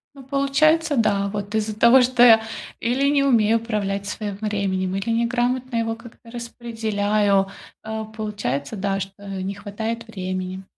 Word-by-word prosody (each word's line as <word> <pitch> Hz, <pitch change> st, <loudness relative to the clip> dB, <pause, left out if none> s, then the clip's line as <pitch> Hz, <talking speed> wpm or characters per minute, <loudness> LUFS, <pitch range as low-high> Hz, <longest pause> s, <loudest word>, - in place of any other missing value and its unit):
Ну, 275 Hz, -, -12 dB
получается, 290 Hz, +3 st, +2 dB
да. 200 Hz, -3 st, +2 dB
Вот 205 Hz, +1 st, -4 dB
из-за 215 Hz, -1 st, -1 dB
того, 235 Hz, +3 st, +7 dB
что 250 Hz, 0 st, +2 dB
я 225 Hz, -2 st, +8 dB, 0.4 s
или 255 Hz, +4 st, +1 dB
не 285 Hz, -1 st, +3 dB
умею 230 Hz, -5 st, +4 dB
управлять 200 Hz, -3 st, -2 dB
своим 205 Hz, -1 st, -4 dB
временем, 195 Hz, -3 st, -1 dB
или 195 Hz, +4 st, -3 dB
неграмотно 240 Hz, +2 st, 0 dB
его 225 Hz, 0 st, 0 dB
как-то 230 Hz, +1 st, -15 dB
распределяю, 215 Hz, -4 st, 0 dB, 0.4 s
а, 220 Hz, 0 st, -4 dB
получается, 210 Hz, -, -4 dB
да, 195 Hz, -1 st, -1 dB
что 195 Hz, +1 st, -7 dB
не 195 Hz, 0 st, -4 dB
хватает 220 Hz, +3 st, -5 dB
времени. 185 Hz, -2 st, -4 dB
220 Hz, 145 wpm, -22 LUFS, 200-235 Hz, 0.4 s, я